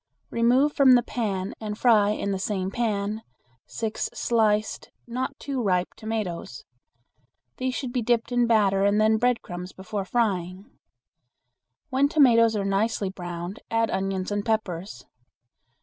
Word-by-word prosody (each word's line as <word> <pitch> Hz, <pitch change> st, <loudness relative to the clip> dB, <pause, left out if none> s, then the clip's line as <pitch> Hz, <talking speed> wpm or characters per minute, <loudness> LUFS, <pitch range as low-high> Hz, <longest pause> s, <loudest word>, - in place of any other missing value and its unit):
Remove 250 Hz, +5 st, +3 dB
from 265 Hz, -2 st, +6 dB
the 245 Hz, -, +3 dB
pan 200 Hz, -5 st, -3 dB
and 210 Hz, -1 st, -4 dB
fry 215 Hz, -4 st, +4 dB
in 200 Hz, -1 st, -1 dB
the 195 Hz, -, -2 dB
same 190 Hz, -1 st, -2 dB
pan 215 Hz, -2 st, -1 dB, 0.5 s
six 220 Hz, -2 st, -3 dB
sliced 215 Hz, -2 st, 0 dB, 0.2 s
not 255 Hz, +3 st, -4 dB
too 275 Hz, -3 st, -3 dB
ripe 180 Hz, -4 st, +1 dB
tomatoes. 210 Hz, -, -5 dB, 0.9 s
These 255 Hz, 0 st, -2 dB
should 250 Hz, -3 st, -4 dB
be 250 Hz, -, 0 dB
dipped 235 Hz, +1 st, 0 dB
in 245 Hz, -1 st, +2 dB
batter 200 Hz, -4 st, +3 dB
and 200 Hz, +1 st, +3 dB
then 220 Hz, 0 st, +4 dB
breadcrumbs 190 Hz, -7 st, -2 dB
before 195 Hz, +1 st, -5 dB
frying. 190 Hz, -4 st, -1 dB, 1.3 s
When 275 Hz, +2 st, +3 dB
tomatoes 230 Hz, -7 st, +5 dB
are 200 Hz, -1 st, -1 dB
nicely 195 Hz, 0 st, 0 dB
browned 175 Hz, +1 st, -6 dB
add 225 Hz, 0 st, +1 dB
onions 190 Hz, 0 st, -2 dB
and 205 Hz, 0 st, -1 dB
peppers. 190 Hz, -, -3 dB
215 Hz, 135 wpm, -25 LUFS, 195-235 Hz, 1.3 s, from